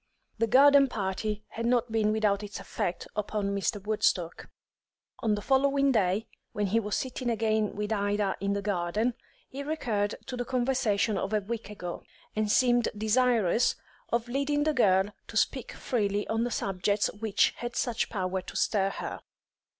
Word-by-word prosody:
The 230 - +2
garden 280 +3 +7
party 210 -1 -3
had 230 +1 -3
not 240 -1 +1
been 215 -1 +2
without 210 -2 +1
its 205 -1 -7
effect 175 - -3
upon 205 -1 -1
Mr. 200 +1 -1
Woodstock. 185 -5 0 0.7
On 215 -2 +1
the 205 - -6
following 275 +1 +3
day, 205 -2 +1 0.3
when 210 - 0
he 210 +4 +2
was 210 -2 -2
sitting 255 -1 -3
again 220 -2 0
with 210 +1 -2
Ida 205 -1 0
in 200 +1 0
the 200 0 -2
garden, 205 +4 0 0.3
he 275 - -7
recurred 230 -9 -1
to 255 - -5
the 245 - -2
conversation 240 -5 +1
of 200 - -3
a 210 - +2
week 220 0 -5
ago, 180 -4 -6 0.3
and 215 -1 +1
seemed 245 -1 +3
desirous 225 -1 +2 0.3
of 235 0 0
leading 280 +3 0
the 310 0 +1
girl 200 -5 +3
to - - -5
speak - - 0
freely 205 -4 -1
on 225 +1 +1
the - - -1
subjects 200 -1 0
which 220 -2 +2
had 240 0 -5
such 235 -2 0
power 190 -3 -2
to - - -10
stir 195 -3 +2
her. - - -6
215 Hz, 165 wpm, -28 LUFS, 200-240 Hz, 0.7 s, garden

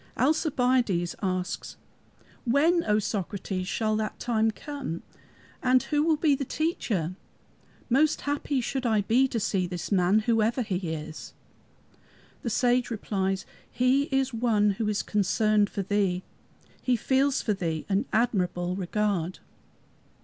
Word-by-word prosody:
Alcibiades 250 - +1
asks, 185 -2 -3 0.7
"When, 315 +8 +3
O 210 -1 +3
Socrates, 195 -2 -3
shall 215 +2 0
that 215 -1 -3
time 225 -2 +1
come, 265 - -5 0.6
and 255 0 +4
who 295 -1 +1
will 315 +1 +3
be 300 -1 +3
the 275 - -1
Teacher? 230 - -1 0.7
Most 290 +5 +3
happy 285 -2 -1
should 260 +2 -2
I 220 -2 +3
be 245 +6 +3
to 240 -3 -2
see 190 -3 0
this 175 +1 -5
man, 190 +2 +4
whoever 230 +2 +1
he 180 -5 -2
is." 155 0 -7 1.1
The 235 - -2
Sage 245 +2 +2
replies, 195 -4 -2 0.2
"He 255 +3 +2
is 270 -2 0
One 220 -3 +2
who 210 +2 -2
is 210 -1 0
concerned 210 +1 +2
for 200 - -3
thee. 190 -2 0 0.6
He 255 - +2
feels 265 +3 +1
for 215 - +1
thee 165 -5 -3
an 200 +4 +1
admirable 180 -6 0
regard." 190 -2 -1
215 Hz, 135 wpm, -27 LUFS, 190-255 Hz, 1.1 s, and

